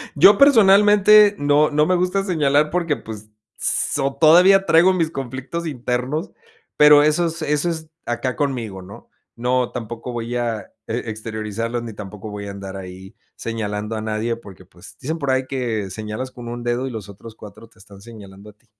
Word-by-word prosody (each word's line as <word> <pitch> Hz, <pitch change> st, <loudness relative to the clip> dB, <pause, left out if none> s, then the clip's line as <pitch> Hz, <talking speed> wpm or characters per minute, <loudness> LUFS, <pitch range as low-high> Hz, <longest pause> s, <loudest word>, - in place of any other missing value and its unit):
Yo 190 Hz, +7 st, +7 dB
personalmente 210 Hz, -4 st, +6 dB
no 145 Hz, +1 st, +3 dB
no 150 Hz, +1 st, +2 dB
me 185 Hz, -, +2 dB
gusta 180 Hz, +2 st, 0 dB
señalar, 150 Hz, -5 st, +1 dB
porque 170 Hz, -4 st, 0 dB
pues, 110 Hz, -1 st, -10 dB, 0.3 s
s 145 Hz, -, -1 dB
o 135 Hz, 0 st, -1 dB
todavía 180 Hz, +5 st, +6 dB
traigo 175 Hz, +3 st, +5 dB
mis 165 Hz, -3 st, -1 dB
conflictos 135 Hz, +5 st, -5 dB
internos, 125 Hz, -, -3 dB, 0.5 s
pero, 150 Hz, 0 st, +7 dB
eso 155 Hz, +3 st, +2 dB
es, 165 Hz, 0 st, -6 dB
eso 150 Hz, +3 st, 0 dB
es 160 Hz, -2 st, -6 dB, 0.2 s
acá 125 Hz, +2 st, -3 dB
conmigo, 120 Hz, -10 st, -3 dB
¿no? 95 Hz, +2 st, -13 dB, 0.3 s
No, 125 Hz, +1 st, -1 dB
tampoco 120 Hz, 0 st, -6 dB
voy 120 Hz, +1 st, -4 dB
a 115 Hz, -4 st, -3 dB, 0.2 s
e 115 Hz, +1 st, -4 dB
exteriorizarlos, 110 Hz, +2 st, -4 dB
ni 115 Hz, -2 st, -7 dB
tampoco 105 Hz, +1 st, -9 dB
voy 100 Hz, 0 st, -7 dB
a -, -, -6 dB
andar 100 Hz, -1 st, -8 dB
ahí 95 Hz, 0 st, -10 dB, 0.2 s
señalando 105 Hz, -1 st, -4 dB
a 110 Hz, -, -4 dB
nadie, 110 Hz, +2 st, -2 dB
porque 100 Hz, -6 st, -14 dB
pues, -, -, -16 dB
dicen 160 Hz, +5 st, -4 dB
por 140 Hz, -3 st, -1 dB
ahí 130 Hz, 0 st, 0 dB
que 115 Hz, -7 st, -3 dB
señalas 110 Hz, +6 st, -6 dB
con 120 Hz, -2 st, -10 dB
1 120 Hz, 0 st, -6 dB
dedo 120 Hz, +2 st, -1 dB
y -, -, -6 dB
los 110 Hz, -4 st, -7 dB
otros 110 Hz, +3 st, -12 dB
4 105 Hz, +2 st, -13 dB
te 115 Hz, -, -26 dB
están 100 Hz, 0 st, -16 dB
señalando 100 Hz, -2 st, -13 dB
a -, -, -28 dB
ti. 105 Hz, +3 st, -37 dB
125 Hz, 185 wpm, -20 LUFS, 110-155 Hz, 0.5 s, Yo